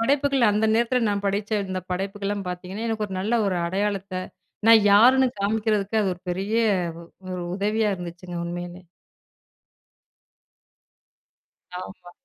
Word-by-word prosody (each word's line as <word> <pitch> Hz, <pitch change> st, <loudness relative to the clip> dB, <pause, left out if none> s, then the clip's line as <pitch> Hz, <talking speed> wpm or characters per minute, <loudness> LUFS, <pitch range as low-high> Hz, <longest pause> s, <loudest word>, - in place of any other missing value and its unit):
படைப்புகள், 275 Hz, +2 st, +2 dB
அந்த 210 Hz, +2 st, +2 dB
நேரத்தில 240 Hz, +2 st, +2 dB
நான் 200 Hz, 0 st, -2 dB
படச்ச, 200 Hz, +2 st, -1 dB, 0.2 s
இந்த 185 Hz, 0 st, -3 dB
படைப்புக்கெல்லாம் 200 Hz, +1 st, -3 dB
பார்த்தீங்கன்னா, 185 Hz, +5 st, -5 dB
எனக்கு 215 Hz, -2 st, -1 dB
ஒரு 190 Hz, -, -6 dB
நல்ல 220 Hz, +5 st, 0 dB
ஒரு 185 Hz, -2 st, 0 dB
அடையாளத்த, 195 Hz, 0 st, -2 dB, 0.5 s
நான் 225 Hz, -2 st, +8 dB
யாருன்னு 255 Hz, +6 st, +6 dB
காமிக்கிறதுக்கு 215 Hz, 0 st, 0 dB
அது 190 Hz, -2 st, 0 dB
ஒரு 175 Hz, -, -24 dB
பெரிய, 195 Hz, +5 st, -2 dB, 0.4 s
வ -, -, -9 dB
ஒ -, -, -18 dB, 0.2 s
ஒரு 180 Hz, -1 st, -4 dB
உதவியா 210 Hz, +2 st, +1 dB
இருந்துச்சுங்க. 175 Hz, 0 st, -8 dB
உண்மையிலே. 175 Hz, +1 st, -6 dB, 2.9 s
ஆமா. 180 Hz, -1 st, -9 dB
200 Hz, 125 wpm, -24 LUFS, 185-220 Hz, 2.9 s, நான்